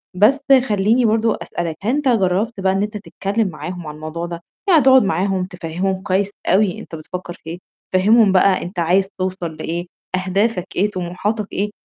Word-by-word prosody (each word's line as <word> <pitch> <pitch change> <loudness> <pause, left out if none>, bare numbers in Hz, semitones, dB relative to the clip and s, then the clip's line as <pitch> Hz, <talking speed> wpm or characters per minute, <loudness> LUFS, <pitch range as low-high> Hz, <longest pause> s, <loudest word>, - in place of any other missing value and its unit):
بس 225 +9 +4 0.3
خلّيني 215 +4 +3
برضه 225 0 +2
أسألك، 170 -2 -4
هل 215 - -1
أنت 295 -2 -1
جرّبت 205 0 +1
بقى 190 0 +2
إن 195 - +1
أنت 210 +1 -4
تتكلم 205 +1 -2
معاهم 175 0 -6
عن 150 - -7
الموضوع 155 +2 -5
ده؟ 170 -1 -6 0.3
يعني 325 -5 +6
تقعد 265 -2 +6
معاهم 190 0 0
تفهّمهم 185 +1 -3
كويس 195 +1 +1 0.2
أوي 190 -1 +2
أنت 165 - -9
بتفكّر 175 +3 -7
في - - -19
إيه. 175 +2 -6 0.3
فهّمهم 210 +2 +5
بقى 190 0 +4
أنت 175 +1 -6
عايز 185 +4 +2
توصل 185 -3 -3
لإيه، 170 +3 -4 0.4
أهدافك 190 0 0
إيه، 205 +3 +1
طموحاتك 190 +4 -3
إيه، 205 +2 -1
190 Hz, 175 wpm, -19 LUFS, 175-210 Hz, 0.4 s, يعني